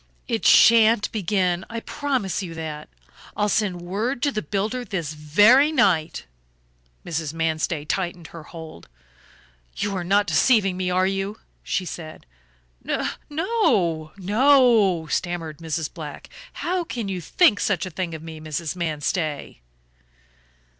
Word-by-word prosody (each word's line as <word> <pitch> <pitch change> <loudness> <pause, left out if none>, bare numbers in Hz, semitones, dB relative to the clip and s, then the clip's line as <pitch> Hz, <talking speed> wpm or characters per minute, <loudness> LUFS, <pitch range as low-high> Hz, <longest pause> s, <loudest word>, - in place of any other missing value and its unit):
"It - - 0
shan't 225 -1 +6
begin, 185 -3 0
I 230 0 -4
promise 260 -11 -2
you 170 -3 -7
that; 155 -2 -6 0.5
I'll 210 - +2
send 190 -5 0
word 225 +8 -2
to 285 - +2
the 215 - -2
builder 210 +9 -2
this 170 -9 -4
very 205 - +5
night." 170 - +1 0.8
Mrs. 160 -2 -3
Manstey 160 -1 -1
tightened 175 0 -3
her 165 - -10
hold. 160 - -11 0.9
"You 205 -1 -2
are 180 - -2
not 200 +3 +2
deceiving 205 -4 +3
me, 185 0 -2
are 185 +1 +2
you?" 195 +2 -2 0.2
she 185 - -2
said. 160 -2 -8 0.6
"No - - -1 0.2
no," 215 - +2
stammered 170 -4 -3
Mrs. 160 -1 -3
Black. 150 -4 -9 0.2
"How 360 +1 -2
can 235 -10 -5
you 185 -2 -3
think 215 - +3
such 195 -3 0
a 185 - -7
thing 170 0 -4
of 160 - -9
me, 160 -1 -8
Mrs. 155 +1 -4
Manstey?" 155 - -3
185 Hz, 135 wpm, -23 LUFS, 160-215 Hz, 0.9 s, shan't